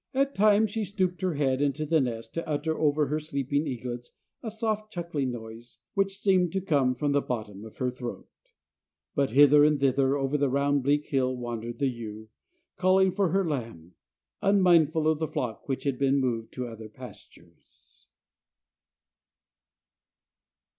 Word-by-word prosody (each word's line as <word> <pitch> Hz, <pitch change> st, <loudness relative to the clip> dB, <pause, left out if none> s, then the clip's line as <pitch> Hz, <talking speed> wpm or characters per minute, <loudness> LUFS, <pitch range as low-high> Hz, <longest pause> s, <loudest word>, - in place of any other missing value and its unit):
At 275 Hz, +1 st, +1 dB
times 210 Hz, +1 st, +4 dB
she 220 Hz, +1 st, -2 dB
stooped 185 Hz, -3 st, -2 dB
her 185 Hz, -4 st, 0 dB
head 135 Hz, -2 st, +1 dB
into 145 Hz, +2 st, 0 dB
the 160 Hz, 0 st, +3 dB
nest 115 Hz, -3 st, -4 dB
to 165 Hz, -, -4 dB
utter 155 Hz, +2 st, -1 dB
over 150 Hz, -1 st, +2 dB
her 150 Hz, +3 st, -1 dB
sleeping 145 Hz, -1 st, -2 dB
eaglets 120 Hz, -1 st, -5 dB, 0.3 s
a 225 Hz, -, -4 dB
soft 215 Hz, -1 st, -3 dB
chuckling 170 Hz, -8 st, -3 dB
noise, 115 Hz, 0 st, -9 dB, 0.2 s
which 195 Hz, 0 st, 0 dB
seemed 185 Hz, -4 st, +2 dB
to 195 Hz, -, +1 dB
come 140 Hz, -8 st, +1 dB
from 145 Hz, +3 st, -1 dB
the 140 Hz, 0 st, +2 dB
bottom 105 Hz, -6 st, -5 dB
of 110 Hz, -, -12 dB
her 125 Hz, -1 st, -1 dB
throat. 125 Hz, -1 st, -7 dB, 0.9 s
But 140 Hz, -1 st, +1 dB
hither 145 Hz, +3 st, +6 dB
and 150 Hz, -1 st, +3 dB
thither 135 Hz, 0 st, +2 dB
over 140 Hz, +1 st, -1 dB
the 140 Hz, -1 st, +2 dB
round 140 Hz, +1 st, +1 dB
bleak 145 Hz, +3 st, +1 dB
hill 130 Hz, -2 st, 0 dB
wandered 120 Hz, -1 st, -5 dB
the 140 Hz, -, 0 dB
ewe, 110 Hz, -3 st, -7 dB, 0.5 s
calling 185 Hz, +1 st, +4 dB
for 195 Hz, -1 st, +1 dB
her 190 Hz, +1 st, +1 dB
lamb, 115 Hz, -, -5 dB, 0.5 s
unmindful 170 Hz, -6 st, +4 dB
of 155 Hz, -1 st, +2 dB
the 160 Hz, -, -1 dB
flock, 120 Hz, -1 st, -4 dB
which 135 Hz, -, -2 dB
had 140 Hz, -3 st, -1 dB
been 140 Hz, 0 st, +3 dB
moved 120 Hz, -4 st, -1 dB
to 125 Hz, -, -4 dB
other 110 Hz, -1 st, -9 dB
pastures. -, -, -16 dB
145 Hz, 160 wpm, -27 LUFS, 125-170 Hz, 0.9 s, hither